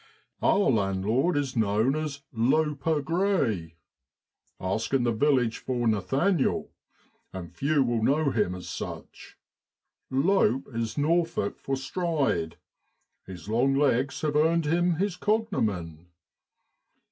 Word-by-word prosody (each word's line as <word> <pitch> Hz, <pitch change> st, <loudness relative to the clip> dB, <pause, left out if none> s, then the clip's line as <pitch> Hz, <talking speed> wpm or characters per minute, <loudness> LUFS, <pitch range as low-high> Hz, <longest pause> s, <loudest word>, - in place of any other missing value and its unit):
1 -, -, +3 dB
Our 200 Hz, -7 st, +3 dB
landlord 110 Hz, -, +1 dB
is 140 Hz, -3 st, -2 dB
known 110 Hz, +4 st, +2 dB
as 150 Hz, -2 st, -4 dB
4 115 Hz, -, -9 dB
Loper 150 Hz, +3 st, +1 dB
' -, -, -11 dB
Grey. 140 Hz, -, 0 dB, 0.8 s
Ask 110 Hz, +8 st, -1 dB
in 130 Hz, -, +2 dB
the 120 Hz, -, +2 dB
village 125 Hz, -1 st, +1 dB
for 120 Hz, -2 st, -2 dB
Nathaniel, 135 Hz, -, +1 dB, 0.6 s
and 90 Hz, -2 st, -8 dB
few 140 Hz, -, +1 dB
will 120 Hz, -2 st, 0 dB
know 140 Hz, +4 st, +2 dB
him 105 Hz, -6 st, 0 dB
as 90 Hz, -, -9 dB
such. -, -, -8 dB, 0.7 s
Lope 150 Hz, -, +2 dB
is 115 Hz, +2 st, -3 dB
Norfolk 165 Hz, -6 st, 0 dB
for 135 Hz, -, -2 dB
stride, 135 Hz, -, -1 dB, 0.7 s
his 90 Hz, -3 st, -10 dB
long 125 Hz, +5 st, +2 dB
legs 140 Hz, -1 st, +1 dB
have 150 Hz, -2 st, -1 dB
earned 160 Hz, +2 st, +3 dB
him 175 Hz, +3 st, +2 dB
his 195 Hz, +2 st, -1 dB
cognomen. 110 Hz, -, -1 dB
135 Hz, 125 wpm, -27 LUFS, 110-160 Hz, 0.8 s, 1